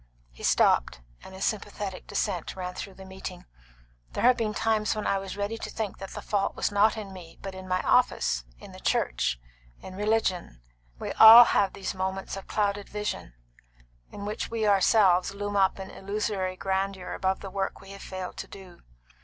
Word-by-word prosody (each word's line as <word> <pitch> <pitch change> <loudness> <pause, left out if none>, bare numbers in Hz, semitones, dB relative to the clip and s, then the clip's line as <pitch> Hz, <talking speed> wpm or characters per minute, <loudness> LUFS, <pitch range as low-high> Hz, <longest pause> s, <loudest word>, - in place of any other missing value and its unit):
He - - -16
stopped, 60 - +3 0.2
and 190 - -11
a 190 - -10
sympathetic 205 -3 -3
dissent 185 -6 -2
ran 180 -1 -5
through 195 +1 -7
the 190 - -11
meeting. 190 -1 -8 0.7
"There - - -2
have 250 +1 +6
been 215 -2 -2
times 220 -1 +1
when 215 - -3
I 195 - +1
was 195 0 -7
ready 205 +3 -3
to - - -5
think 215 -3 -4
that 195 0 -7
the - - -8
fault 200 -1 -1
was - - -1
not 210 +2 +3
in 200 -3 -7
me, 175 -3 -12
but 195 - -5
in 190 0 -9
my 185 0 0
office, - - +2
in - - -12
the - - -11
church, 60 +1 0 0.4
in 185 - -10
religion. 200 - -1 0.4
We - - -5
all 225 +2 +11
have 200 -4 +2
these 195 - -4
moments 190 0 -3
of 195 - -9
clouded 205 -1 -1
vision, 210 - -4 0.8
in 200 - -7
which 210 +1 -4
we 225 -1 -1
ourselves 195 -2 +4
loom 205 0 -4
up 195 -1 +3
in 190 - -7
illusory 195 -2 -3
grandeur 190 -1 -2
above 190 0 -1
the 195 - -7
work 195 0 -3
we 195 0 -13
have 195 - -10
failed 185 -1 -6
to - - -6
do. 185 -3 -13
195 Hz, 190 wpm, -27 LUFS, 185-210 Hz, 0.8 s, all